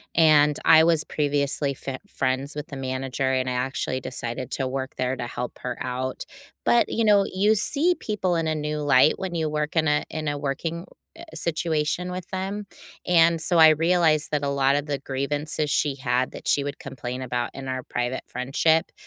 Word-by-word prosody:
and, 150 -2 +5
I 160 -1 +8
was 165 -2 +3
previously 145 -1 0
fen 130 0 -6
friends 130 +2 -2
with 150 0 -5
the 140 - -8
manager, 130 0 -2
and 130 -1 0
I - - -1
actually 130 +1 -2
decided 120 0 -5
to 135 - -1
work 130 0 -4
there 130 +1 -1
to 120 -2 -5
help 120 0 -6
her 125 - -4
out. 130 0 -3 0.4
But, 240 - +3
you 230 - 0
know, 205 -2 +5
you 205 +3 +3
see 305 - +2
people 190 -5 -1
in 165 -1 0
a 155 - 0
new 150 0 -3
light 145 0 +5
when 190 -2 -4
you 160 -2 0
work 150 +1 -2
in 160 0 +3
a 150 0 +2
in 155 -1 -4
a 145 0 -1
working, 160 +4 -3 0.3
eh 335 - -11
situation 165 +1 -1
with 180 -1 -6
them, 195 +2 -3 0.4
and, 165 -1 +4
so 170 +2 +1
I 160 -1 +9
realized 160 -1 +2
that 150 -1 0
a 140 - 0
lot 140 0 +2
of 145 0 -1
the 145 -1 -1
grievances 145 +3 -2
she 145 0 +1
had 130 -1 -1
that - - -9
she 140 - +2
would 140 0 -5
complain 125 0 -6
about 125 -1 -2
in 135 0 -8
our 130 -1 -3
private 120 +2 -3
friendship, 140 +6 +1
145 Hz, 200 wpm, -24 LUFS, 130-165 Hz, 0.4 s, I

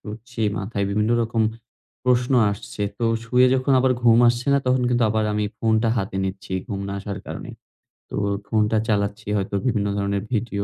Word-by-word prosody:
শুচ্ছি, 115 +3 -9 0.2
মাথায় 100 0 -2
বিভিন্ন 105 +2 +1
রকম 115 0 0 0.6
প্রশ্ন 125 +1 +2 0.2
আসছে। 100 0 -6 0.2
তো 120 - -1 0.2
শুয়ে 125 +2 +4
যখন 130 +1 +1
আবার 130 0 +3
ঘুম 115 -1 +6
আসছে 120 +2 -1
না, 140 - +4
তখন 125 0 +2
কিন্তু 120 -1 +1
আবার 110 0 +1
আমি 105 0 0
ফোনটা 110 0 +2
হাতে 95 -1 -3
নিচ্ছি, 95 0 -5 0.2
ঘুম 100 -1 -3
না - - -4
আসার 100 0 -5
কারণে। - - -7 0.6
তো - - -6 0.3
ফোনটা 110 0 +2
চালাচ্ছি, 100 -1 -1
হয়তো 100 +1 -2
বিভিন্ন 105 -5 +1
ধরনের 100 0 -1
ভিডিও, 105 -3 -1
110 Hz, 175 wpm, -23 LUFS, 100-120 Hz, 0.6 s, ঘুম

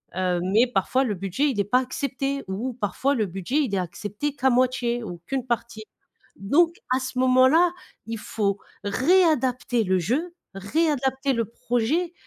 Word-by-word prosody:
heu, 180 -1 0
mais 215 +7 +3
parfois, 245 +4 +1
le 220 -6 -1
budget 195 +11 0
il 220 -6 -3
est - - +3
pas 230 +6 +2
accepté 275 +1 -3
ou 230 +7 -3
parfois 250 +5 -1
le 220 -4 +1
budget 195 - -3
il 225 -8 -3
est - - +1
accepté 205 - -4
qu'à 265 -1 +2
moitié 245 -1 +1
ou 175 -5 -7
qu'une 265 -2 -2
partie. 235 -2 -3 0.5
Donc, 325 - +2 0.2
à - - +1
ce 260 -1 -4
moment-là, 260 +7 +5 0.3
il 225 0 -4
faut 210 -3 -2 0.2
réadapter 255 - +2
le 185 -1 +1
jeu 290 - -1 0.2
réadapter 270 - 0
le 230 -2 0
projet 245 - -1
245 Hz, 160 wpm, -24 LUFS, 205-270 Hz, 0.5 s, moment-là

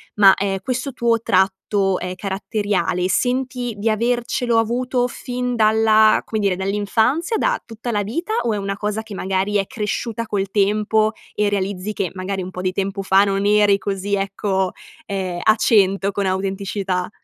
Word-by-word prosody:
ma, 195 -2 +7
ehm, 195 -1 -1
questo 255 +3 -3
tuo 235 -2 +1
tratto, 190 -1 +1
ehm, 180 +1 -4
caratteriale, 195 -2 -1
senti 250 +1 -1
di 215 +2 0
avercelo 240 +1 0
avuto 245 +2 0
fin 250 0 -4
dalla 220 -1 +4
come 220 - -3
dire 200 -3 +1
dall'infanzia, 210 - 0
da - - 0
tutta 230 +1 -7
la 205 -2 0
vita, 335 - -3
o 230 - 0
è - - -1
una 195 0 -3
cosa 210 +1 -2
che 220 -2 -9
magari 190 +2 -1
è 195 - 0
cresciuta 230 0 -3
col 200 -2 -2
tempo 215 +2 +2 0.2
e 210 -1 +1
realizzi 200 0 -2
che 185 -4 -2
magari 190 +1 -4
un 185 - -7
po' 180 - -6
di 185 0 0
tempo 195 +1 -2
fa 195 +1 +4
non 195 0 0
eri 205 -1 +4
così 200 0 -3
ecco, 195 -1 -1 0.4
ehm, 185 -3 -3
a 215 - +5
cento 200 -3 +3
con 200 0 -2
autenticità. 190 -1 -2
205 Hz, 165 wpm, -20 LUFS, 195-225 Hz, 0.4 s, ma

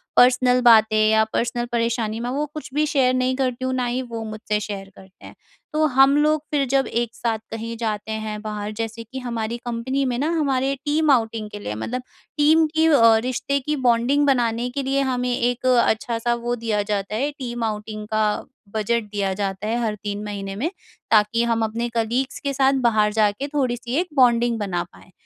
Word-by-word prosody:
Personal 250 0 +5
बातें 220 -2 +6
या 220 0 +4
personal 240 0 -1
परेशानी 230 -2 -1
में 240 +1 -3
वो 290 +3 -1
कुछ 305 - -7
भी 300 +1 +2
शेयर 265 -4 +2
नहीं 255 0 +1
करती 255 -1 -1
हूँ, 260 - -1
ना 255 -1 0
ही 245 +2 -1
वो 230 -3 -6
मुझसे 215 -1 -3
शेयर 195 -2 -6
करते 190 0 -16
हैं। - - -12 0.4
तो 310 0 +2
हम 270 0 +5
लोग 305 0 +2
फिर 285 -2 +1
जब 270 0 +2
एक 235 0 -2
साथ 225 -2 -1
कहीं 230 +1 -5
जाते 220 -1 -3
हैं 215 -1 -4
बाहर, 210 -1 -4
जैसे 225 +1 -5
कि 260 +4 -8
हमारी 235 -2 -3
कंपनी 260 +4 -1
में 240 - -2
ना, 300 +4 0
हमारे 270 -2 +1
टीम 300 0 +2
आउटिंग 225 -3 0
के 205 - -7
लिए 105 - -5
मतलब 245 - -4 0.4
टीम 315 +2 +5
की 320 0 +4
अ, 230 -7 +6
रिश्ते 270 +2 -1
की 300 +3 -2
बॉन्डिंग 245 +5 +3
बनाने 240 -2 +1
के 275 +2 -3
लिए 275 +1 +1
हमें 250 0 0
एक 245 +1 -1
अच्छा 235 -2 +2
सा 240 +1 +1
वो 240 +1 -2
दिया 225 -3 -1
जाता 200 +1 -3
है 280 +6 0
टीम 240 -4 -5
आउटिंग 215 -1 -4
का 215 0 +2 0.5
बजट 230 +2 0
दिया 195 -2 -1
जाता 195 +1 -3
है 235 +2 0
हर 215 -2 -1
3 205 0 -4
महीने 195 -1 -5
में, 275 +11 -1 0.4
ताकि 220 +2 +4
हम 230 -1 +1
अपने 235 +2 -3
कलीग्स 240 +4 -1
के 280 -1 -3
साथ 270 0 +3
बाहर 210 -2 +2
जा 215 -1 +4
के 270 +7 -5
थोड़ी-सी 255 -3 -2
एक 360 - -1
बॉन्डिंग 240 -2 +4
बना 180 -4 -2
पाएँ। 185 - -18
235 Hz, 200 wpm, -22 LUFS, 215-260 Hz, 0.5 s, बातें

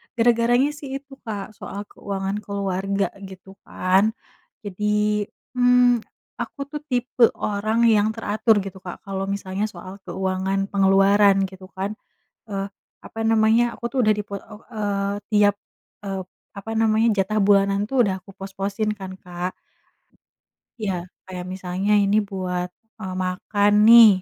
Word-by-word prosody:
Gara-garanya 240 +4 +3
sih 280 -3 -7
itu, 275 0 -9
Kak, 205 -1 -4
soal 200 +1 -6
keuangan 195 +1 -3
keluarga 195 -1 -2
gitu 190 -1 -11 0.2
kan. 195 +5 +2 0.5
Jadi, 210 +1 0 0.2
mmm, 245 -1 +4 0.4
aku - - -6
tuh 300 - -4
tipe 245 -2 +3
orang 215 +3 0
yang 220 -1 +4
teratur 215 -1 +2
gitu, 190 -1 -8
Kak. 180 -1 -9
Kalau 195 -1 -4
misalnya 200 +1 -2
soal 185 0 -10
keuangan 190 +2 -1
pengeluaran 195 0 +5
gitu 190 0 -7
kan. 195 +2 -2 0.6
Eee, 195 0 -2 0.3
apa 225 - -10
namanya, 225 +2 +3
aku 235 - -2
tuh 250 +3 -6
udah 215 - +4
di 210 0 -1
pe 200 - -5
e - - -7 0.3
eee, 200 -1 -1 0.2
tiap, 205 -1 +4 0.5
eee, 195 -1 -3 0.3
apa 200 +2 -8
namanya, 220 0 +3
jatah 215 +3 -1
bulanan 200 0 +3
itu 270 - -1
udah 190 -3 -1
aku 195 +1 -15
pos-posin 195 +2 -3
kan, 190 -1 -7
Kak. 180 0 -5 1.3
Iya, 195 -3 0 0.3
kayak 180 -1 -7
misalnya 185 +2 -2
ini 200 +2 +3
buat, 180 -2 -3 0.3
eee, 190 -3 -5
makan 205 +3 +1 0.2
nih 230 -1 +11
200 Hz, 140 wpm, -23 LUFS, 195-220 Hz, 1.3 s, nih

